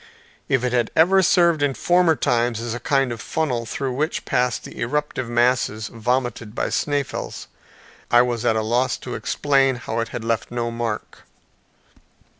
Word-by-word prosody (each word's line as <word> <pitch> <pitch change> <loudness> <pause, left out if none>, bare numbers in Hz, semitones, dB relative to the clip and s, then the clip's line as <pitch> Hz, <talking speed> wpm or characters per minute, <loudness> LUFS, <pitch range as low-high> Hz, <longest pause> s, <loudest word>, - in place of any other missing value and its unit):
If 135 -3 +2
it 125 -1 0
had 120 -2 +1
ever 190 +4 +5
served 170 -4 +3
in 140 -2 +1
former 175 -2 +3
times 120 -4 0
as 115 0 -4
a 120 - -4
kind 135 +1 +1
of 115 - -5
funnel 125 -8 -2
through 135 +3 -3
which 150 +5 -2
passed 125 -1 0
the - - -10
eruptive 130 -1 -2
masses 120 -3 +1
vomited 120 -1 -2
by - - -1
Sneffels, 145 -2 -2 0.6
I 120 +1 +6
was 120 -2 -2
at 115 -2 +2
a 110 - 0
loss 120 +4 +1
to - - -7
explain 135 -2 +1
how 115 -1 -4
it 115 - -1
had 120 -1 -6
left 115 -1 -1
no 120 -1 -2
mark. 115 -2 -4
125 Hz, 170 wpm, -22 LUFS, 115-140 Hz, 0.6 s, I